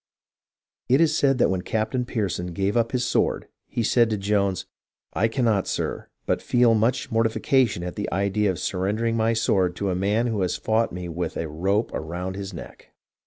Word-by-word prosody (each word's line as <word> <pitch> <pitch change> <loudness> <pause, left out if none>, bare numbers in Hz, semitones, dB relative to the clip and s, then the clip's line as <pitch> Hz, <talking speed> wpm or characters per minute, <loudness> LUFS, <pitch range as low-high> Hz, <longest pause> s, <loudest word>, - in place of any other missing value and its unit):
^ - - -70 0.9
It - - +3
is 160 -2 +3
said 135 -3 +3
that 120 - +3
when 95 -1 -1
Captain 110 +5 -1
Pearson 95 -7 -2
gave 100 +4 -1
up 115 -1 +1
his 125 -1 0
sword, - - 0 0.2
he 120 - -2
said 115 +1 +3
to 110 - -1
Jones, 100 -2 0 0.3
" - - -70
I 110 - +2
cannot, 115 -5 +1
sir, - - -3 0.2
but - - 0
feel 120 -2 +3
much 115 +4 +1
mortification 115 -2 +2
at 90 0 -5
the 105 - -4
idea 100 +2 +1
of 95 - -1
surrendering 105 +7 -1
my 115 0 +2
sword 95 -6 +1
to 100 -2 -1
a - - -1
man 105 +5 +1
who 110 -4 -1
has 90 - 0
fought 110 +1 +1
me 90 0 -6
with 85 +1 -4
a 80 - -2
rope 95 +8 0
ro7ind 90 +4 -4
his 100 0 -5
neck.'' 85 - -11
105 Hz, 200 wpm, -24 LUFS, 95-115 Hz, 0.9 s, It